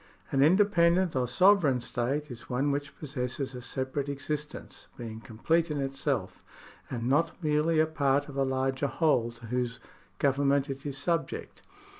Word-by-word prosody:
An 135 - +2
independent 175 0 +4
or 125 -1 +1
sovereign 155 - +4
state 130 +5 -2
is 120 -1 -10
one 135 +3 +1
which 140 0 -4
possesses 135 -1 -4
a 125 - -7
separate 130 +3 -3
existence, 150 +1 -5
being 115 -2 -7
complete 160 +10 0
in 150 -1 -2
itself, 135 -6 -2 0.5
and 120 -1 -3
not 160 +5 +2
merely 155 +1 +2
a 155 - +5
part 145 -2 +1
of 145 - -9
a 140 - 0
larger 130 +1 0
whole 135 -6 +2
to 120 0 -13
whose 120 0 -2 0.4
government 140 0 +2
it 135 +2 -6
is 135 -1 -4
subject. 165 -4 -2
140 Hz, 155 wpm, -29 LUFS, 125-150 Hz, 0.5 s, a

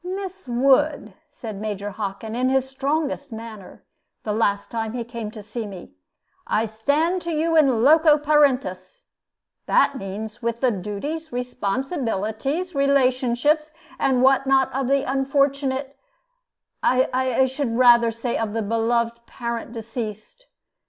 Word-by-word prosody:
"Miss 380 -2 -6
Wood," 265 -1 +2 0.2
said 215 -4 -8
Major 205 -1 -4
Hockin, 205 +2 -5
in 255 +1 +1
his 265 0 +1
strongest 280 +1 -2
manner, 220 -3 -10 0.4
the 210 - -2
last 205 -2 0
time 225 -1 -3
he 245 -1 -3
came 230 -2 -6
to 215 -1 -10
see 220 +1 -5
me, 190 -3 -10 0.6
"I 220 - +1
stand 290 - 0
to 340 - -4
you 325 +1 0
in 265 -8 +4
loco 305 +2 +6
parentis. 270 -11 +1 0.6
That 270 - +3
means, 210 +4 -6
with 235 0 -2
the 255 -1 +2
duties, 235 - -5
relationships, 245 0 -4 1.2
responsibilities, 275 +2 +2 0.3
and 260 -2 +2
what 270 0 +4
not, 265 -1 +3
of 270 -1 -1
the 275 +1 +2
unfortunate 275 0 0 0.9
I 255 0 +2
should 265 +1 -2
say - - -3
rather 240 -1 +6
of 230 -2 -2
the 225 -1 -1
beloved 235 +1 0
parent 235 -1 -5
deceased. 230 - -7
250 Hz, 130 wpm, -23 LUFS, 225-275 Hz, 1.2 s, loco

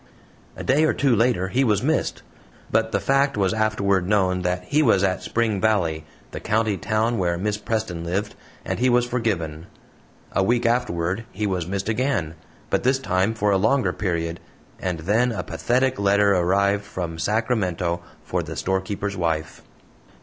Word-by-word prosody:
A - - -7
day 150 +4 +3
or - - +2
two 135 -4 +3
later 115 -5 +1
he 130 +7 +2
was 105 -3 +2
missed 160 +4 0 0.5
but 110 0 +1
the 100 - +1
fact 135 +5 +2
was 95 -2 +2
afterward 100 -4 +1
known 95 -3 +2
that 90 0 -1
he 145 +10 +1
was 110 -9 +3
at 95 -1 +1
Spring 110 -4 0
Valley, 85 -8 +1 0.3
the - - -6
county 110 -1 0
town 110 +5 0
where 85 -2 0
Miss 105 +3 -2
Preston 105 -7 -3
lived, 95 +5 -2 0.3
and - - -2
he 130 +1 +3
was 120 0 +3
forgiven. 95 -10 -2 0.6
A - - +1
week 120 +5 +1
afterward 110 -4 0
he 105 +2 -3
was 90 -4 -1
missed 95 +1 -3
again, 110 - 0 0.4
but - - +2
this 130 +2 +2
time 100 -4 0
for 105 -1 +1
a 100 - +4
longer 115 +7 +2
period, 85 -4 -2 0.4
and 90 -4 -3
then 110 +8 +2
a - - -3
pathetic 130 +1 0
letter 100 0 +4
arrived 100 +3 +2
from 85 -4 -5
Sacramento 95 -6 0 0.2
for - - -2
the - - -7
storekeeper's 95 +1 -2
wife. 80 -3 -2
100 Hz, 170 wpm, -23 LUFS, 90-115 Hz, 0.6 s, a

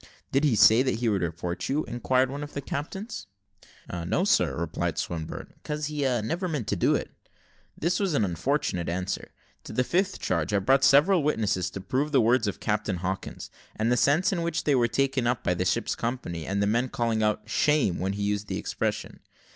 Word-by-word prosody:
"Did 135 +2 +2
he 140 -7 +3
say 110 +3 +7
that 130 -2 +1
he 115 0 0
would 100 -3 +1
report 85 +1 -3
you?" 145 +3 +1
inquired 125 +2 +1
one 140 +1 -5
of 145 0 -7
the - - -1
captains. 160 - -5 0.8
"No, - - +1
sir," 70 - +2
replied 85 +1 -2
Swinburne, 80 -2 -5
"'cause 150 0 -3
he 150 0 -3 0.2
never 175 - -2
meant 150 -9 -2
to - - +1
do - - +2
it." - - -3 0.7
This 175 +3 0
was 195 -6 0
an 110 - +3
unfortunate 95 - -1
answer. 90 +2 -3 0.3
To - - -9
the 125 - +1
fifth 185 +8 0
charge, 85 +1 -1
I - - +4
brought 135 +8 +3
several 165 +6 +5
witnesses 110 - 0
to 100 - -7
prove 135 +9 -1
the 140 - +4
words 115 0 +3
of 100 - -3
Captain 105 -2 -1
Hawkins, 95 +2 -5 0.2
and 110 +2 0
the - - +4
sense 145 +10 +3
in 175 - -1
which 170 -1 -1
they 145 - +2
were 120 -3 +3
taken 130 0 +1
by 90 - +2
the 90 +1 -1
ship's 90 - 0
company, 85 -10 -4
and 100 +1 0
the - - +3
men 120 +5 +1
calling 115 -2 0
out 105 0 0
"Shame!" 135 - +2
when 95 +2 -1
he 100 0 -3
used 105 0 -1
the - - -3
expression. - - -3
120 Hz, 205 wpm, -27 LUFS, 95-145 Hz, 0.8 s, say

